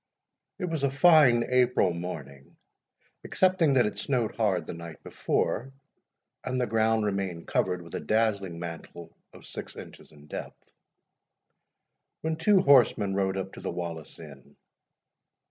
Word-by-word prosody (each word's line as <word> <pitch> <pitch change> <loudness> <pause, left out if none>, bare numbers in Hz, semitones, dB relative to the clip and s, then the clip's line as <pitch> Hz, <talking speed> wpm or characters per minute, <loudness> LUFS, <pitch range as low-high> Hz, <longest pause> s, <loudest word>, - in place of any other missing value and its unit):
It 185 - -3
was 165 -4 -3
a 140 - +2
fine 140 -4 +5
April 125 -7 +2
morning 70 -6 -8 0.7
(excepting 180 -6 +2
that 125 -3 +4
it - - +1
had - - -17
snowed 125 -6 -1
hard 100 -6 0
the - - -6
night 85 -2 -10
before, 130 +5 -2 0.7
and 130 0 -2
the 125 - +1
ground 110 0 +1
remained 95 -4 -3
covered 90 -1 0
with 85 - -14
a - - -2
dazzling 100 -5 0
mantle 85 0 -8 0.2
of - - -15
six - - -8
inches - - -12
in 75 -1 -17
depth) 75 - -9 1.5
when 160 0 -1
two 190 +4 +4
horsemen 120 - +4
rode 95 -1 0
up 95 0 -5
to - - -10
the - - -4
Wallace 85 -3 -6
Inn. 70 -5 -13
105 Hz, 145 wpm, -27 LUFS, 85-130 Hz, 1.5 s, fine